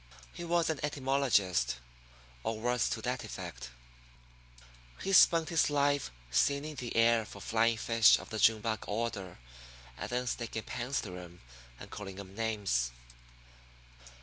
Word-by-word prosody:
He -, -, -7 dB
was 170 Hz, -1 st, +1 dB
an 155 Hz, -, -4 dB
etymologist, 130 Hz, -, +1 dB, 0.7 s
or 110 Hz, -, -3 dB
words 120 Hz, 0 st, +1 dB
to 110 Hz, -, -3 dB
that 125 Hz, 0 st, -2 dB
effect. -, -, -7 dB, 1.3 s
He 195 Hz, -, -1 dB
spent 165 Hz, -3 st, +6 dB
his 165 Hz, -3 st, +3 dB
life 145 Hz, -1 st, +1 dB, 0.2 s
seining 140 Hz, -, +1 dB
the 120 Hz, -2 st, -5 dB
air 115 Hz, 0 st, +4 dB
for -, -, -11 dB
flying 115 Hz, 0 st, +1 dB
fish 115 Hz, 0 st, +5 dB
of -, -, -11 dB
the 110 Hz, -, -3 dB
June 110 Hz, -1 st, +5 dB
bug 110 Hz, 0 st, -2 dB
order, 105 Hz, -4 st, -3 dB, 0.6 s
and -, -, -4 dB
then 125 Hz, +1 st, -1 dB
sticking 115 Hz, -2 st, -3 dB
pins 125 Hz, +2 st, -3 dB
through 90 Hz, -3 st, -7 dB
'em 90 Hz, 0 st, -12 dB, 0.4 s
and -, -, -11 dB
calling 100 Hz, -2 st, -7 dB
'em 95 Hz, -1 st, -10 dB
names. 100 Hz, -, 0 dB
115 Hz, 145 wpm, -32 LUFS, 105-135 Hz, 1.3 s, spent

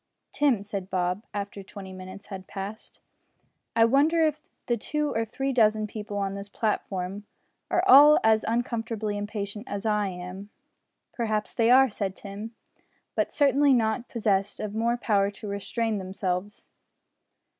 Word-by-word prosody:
"Tim," 265 Hz, -9 st, +2 dB
said 200 Hz, -2 st, -5 dB
Bob, 180 Hz, +3 st, -1 dB
after 200 Hz, 0 st, -5 dB
twenty 190 Hz, 0 st, -10 dB
minutes 185 Hz, +2 st, -10 dB
had 190 Hz, -2 st, -8 dB
passed, 200 Hz, +2 st, -7 dB, 0.8 s
"I 225 Hz, -, +6 dB
wonder 305 Hz, +7 st, +4 dB
if 305 Hz, -1 st, -1 dB, 0.2 s
the 240 Hz, -, +1 dB
two 300 Hz, +6 st, -2 dB
or 225 Hz, 0 st, 0 dB
three 270 Hz, +5 st, -2 dB
dozen 215 Hz, -3 st, +3 dB
people 210 Hz, -1 st, -6 dB
on 195 Hz, -1 st, -1 dB
this 200 Hz, 0 st, -7 dB
platform 200 Hz, -2 st, -2 dB, 0.4 s
are -, -, +2 dB
all 295 Hz, +3 st, +9 dB
as 220 Hz, -1 st, +4 dB
uncomfortably 225 Hz, -2 st, -1 dB
impatient 205 Hz, +1 st, -5 dB
as 200 Hz, +1 st, -5 dB
I 210 Hz, -2 st, +1 dB
am." 185 Hz, +2 st, -7 dB, 0.6 s
"Perhaps 215 Hz, -3 st, -2 dB
they 230 Hz, 0 st, +2 dB
are," 260 Hz, 0 st, +6 dB
said 195 Hz, -2 st, -3 dB
Tim, 210 Hz, +3 st, -8 dB, 0.6 s
"but -, -, 0 dB
certainly 280 Hz, -2 st, +4 dB, 0.3 s
possessed 205 Hz, -3 st, 0 dB
of 210 Hz, -1 st, -4 dB
more 230 Hz, +2 st, +1 dB
power 200 Hz, -4 st, +2 dB
to 205 Hz, +1 st, -9 dB
restrain 205 Hz, +2 st, -2 dB
themselves." 190 Hz, +1 st, -3 dB
210 Hz, 145 wpm, -27 LUFS, 200-230 Hz, 0.8 s, all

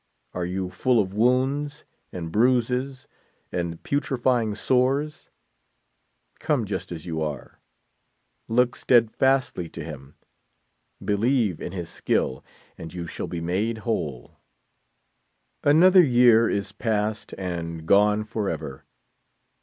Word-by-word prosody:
Are 90 Hz, -1 st, -2 dB
you 90 Hz, 0 st, -3 dB
full 120 Hz, +6 st, +2 dB
of 95 Hz, -2 st, -1 dB
wounds, 130 Hz, +6 st, +1 dB, 0.3 s
and 85 Hz, -3 st, -6 dB
bruises, 125 Hz, +4 st, +1 dB, 0.4 s
and 85 Hz, -2 st, -4 dB
putrefying 125 Hz, -6 st, 0 dB
sores? 135 Hz, +6 st, 0 dB, 1.1 s
Come 135 Hz, -7 st, 0 dB
just 95 Hz, -3 st, -5 dB
as 80 Hz, -3 st, -6 dB
you 80 Hz, -2 st, -3 dB
are. 75 Hz, -4 st, -5 dB, 0.9 s
Look 125 Hz, +2 st, +2 dB
steadfastly 125 Hz, -5 st, +2 dB
to 80 Hz, -, -7 dB
him, 70 Hz, -3 st, -10 dB, 0.9 s
believe 105 Hz, -, +1 dB
in -, -, -5 dB
his 90 Hz, -3 st, -5 dB
skill, 65 Hz, -5 st, -1 dB, 0.4 s
and 80 Hz, -, -8 dB
you 85 Hz, 0 st, -6 dB
shall -, -, -5 dB
be 85 Hz, -, -5 dB
made 105 Hz, +6 st, -2 dB
whole, 75 Hz, -, -3 dB, 1.2 s
44 -, -, +2 dB
Another 185 Hz, +5 st, +7 dB
year 120 Hz, -4 st, +5 dB
is 100 Hz, -1 st, -2 dB
past 110 Hz, -1 st, -2 dB
and 85 Hz, -3 st, -5 dB
gone 105 Hz, +4 st, +4 dB
forever. 105 Hz, -11 st, -4 dB
105 Hz, 115 wpm, -25 LUFS, 85-125 Hz, 1.2 s, Another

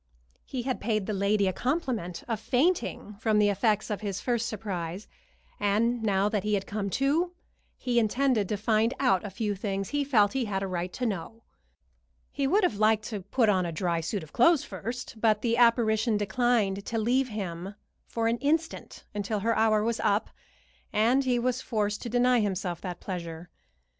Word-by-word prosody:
He 255 Hz, -3 st, -4 dB
had 260 Hz, 0 st, -2 dB
paid 215 Hz, -2 st, 0 dB
the 215 Hz, -, -2 dB
lady 200 Hz, +1 st, +2 dB
the 185 Hz, -, +1 dB
compliment 245 Hz, -, -2 dB
of 225 Hz, -3 st, -2 dB
fainting 250 Hz, -, 0 dB
from 220 Hz, -2 st, +2 dB
the 210 Hz, -1 st, +4 dB
effects 210 Hz, +1 st, +1 dB
of 210 Hz, -, -3 dB
his 200 Hz, -3 st, -3 dB
first 235 Hz, -2 st, -1 dB
surprise, 190 Hz, -3 st, -5 dB, 0.5 s
and 225 Hz, +4 st, +1 dB
now 200 Hz, -2 st, +2 dB
that 210 Hz, -2 st, -1 dB
he 210 Hz, 0 st, +1 dB
had 195 Hz, -, -2 dB
come 200 Hz, -1 st, -3 dB
to 315 Hz, +7 st, +1 dB, 0.4 s
he 245 Hz, -2 st, +1 dB
intended 235 Hz, -2 st, +1 dB
to 210 Hz, -, -1 dB
find 220 Hz, +3 st, +1 dB
out 250 Hz, -9 st, +3 dB
a 205 Hz, -, -4 dB
few 205 Hz, +2 st, -2 dB
things 195 Hz, -1 st, -3 dB
he 290 Hz, 0 st, 0 dB
felt 225 Hz, -7 st, +3 dB
he 265 Hz, -2 st, 0 dB
had 195 Hz, -2 st, -2 dB
a -, -, -2 dB
right 180 Hz, -1 st, -3 dB
to 250 Hz, -, -3 dB
know. 225 Hz, +2 st, -4 dB, 0.9 s
He 275 Hz, -1 st, -1 dB
would 395 Hz, +8 st, +3 dB
have 230 Hz, -, +1 dB
liked 215 Hz, 0 st, +3 dB
to 210 Hz, -4 st, -4 dB
put 230 Hz, +5 st, +1 dB
on 190 Hz, -3 st, +3 dB
a 170 Hz, -, -3 dB
dry 170 Hz, 0 st, -1 dB
suit 175 Hz, +3 st, -3 dB
of 155 Hz, -, -14 dB
clothes 295 Hz, +4 st, +4 dB
first, 240 Hz, -4 st, -6 dB
but 215 Hz, -2 st, +3 dB
the 230 Hz, -1 st, +2 dB
apparition 230 Hz, -2 st, +3 dB
declined 210 Hz, -2 st, +1 dB
to 230 Hz, -, -2 dB
leave 250 Hz, +4 st, +2 dB
him 195 Hz, -2 st, -5 dB, 0.3 s
for 225 Hz, -1 st, -1 dB
an 230 Hz, +1 st, 0 dB
instant 320 Hz, +3 st, -1 dB
until 205 Hz, 0 st, -2 dB
her 230 Hz, +2 st, +1 dB
hour 215 Hz, -1 st, +3 dB
was 230 Hz, 0 st, -1 dB
up, 205 Hz, +1 st, +1 dB, 0.6 s
and 240 Hz, +6 st, +3 dB
he 250 Hz, -1 st, +2 dB
was 250 Hz, +1 st, 0 dB
forced 210 Hz, -3 st, -1 dB
to 240 Hz, -, -5 dB
deny 245 Hz, +1 st, +3 dB
himself 190 Hz, -4 st, -2 dB
that 180 Hz, -2 st, -6 dB
pleasure. 170 Hz, -2 st, -6 dB
215 Hz, 190 wpm, -28 LUFS, 200-245 Hz, 0.9 s, the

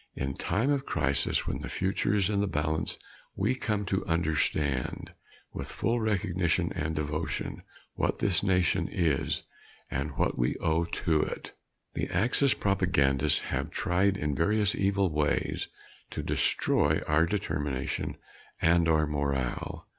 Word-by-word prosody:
In 65 Hz, 0 st, -2 dB
time 120 Hz, -, 0 dB
of 140 Hz, -2 st, +1 dB
crisis 70 Hz, +1 st, +1 dB
when -, -, -2 dB
the -, -, -5 dB
future 95 Hz, +2 st, 0 dB
is 100 Hz, -3 st, +3 dB
in 100 Hz, -1 st, +1 dB
the 100 Hz, -, +1 dB
balance, 80 Hz, -2 st, -1 dB, 0.4 s
we -, -, +1 dB
come 105 Hz, -5 st, -1 dB
to 95 Hz, +1 st, 0 dB
understand, 75 Hz, -4 st, 0 dB, 0.4 s
with -, -, -5 dB
full 120 Hz, +1 st, -1 dB
recognition 90 Hz, -5 st, 0 dB
and 80 Hz, -1 st, -2 dB
devotion, 75 Hz, +2 st, -3 dB, 0.3 s
what -, -, 0 dB
this 100 Hz, -5 st, +3 dB
nation 90 Hz, -4 st, +2 dB
is 80 Hz, -6 st, 0 dB, 0.5 s
and 70 Hz, 0 st, -3 dB
what -, -, 0 dB
we -, -, +1 dB
owe 80 Hz, +1 st, +1 dB
to 80 Hz, -2 st, +1 dB
it. -, -, -4 dB, 0.4 s
The -, -, -2 dB
Axis 125 Hz, +8 st, +2 dB
propagandists 75 Hz, -8 st, +2 dB
have -, -, -2 dB
tried 95 Hz, +2 st, +1 dB
in 75 Hz, -3 st, -1 dB
various 105 Hz, +7 st, +2 dB
evil 100 Hz, -2 st, +1 dB
ways 75 Hz, 0 st, 0 dB, 0.4 s
to -, -, -4 dB
destroy 75 Hz, +2 st, +2 dB
our 80 Hz, +2 st, +3 dB
determination 75 Hz, -8 st, -2 dB, 0.4 s
and 85 Hz, 0 st, +4 dB
our 80 Hz, -1 st, +4 dB
morale. 70 Hz, -4 st, -2 dB
85 Hz, 140 wpm, -29 LUFS, 75-100 Hz, 0.5 s, and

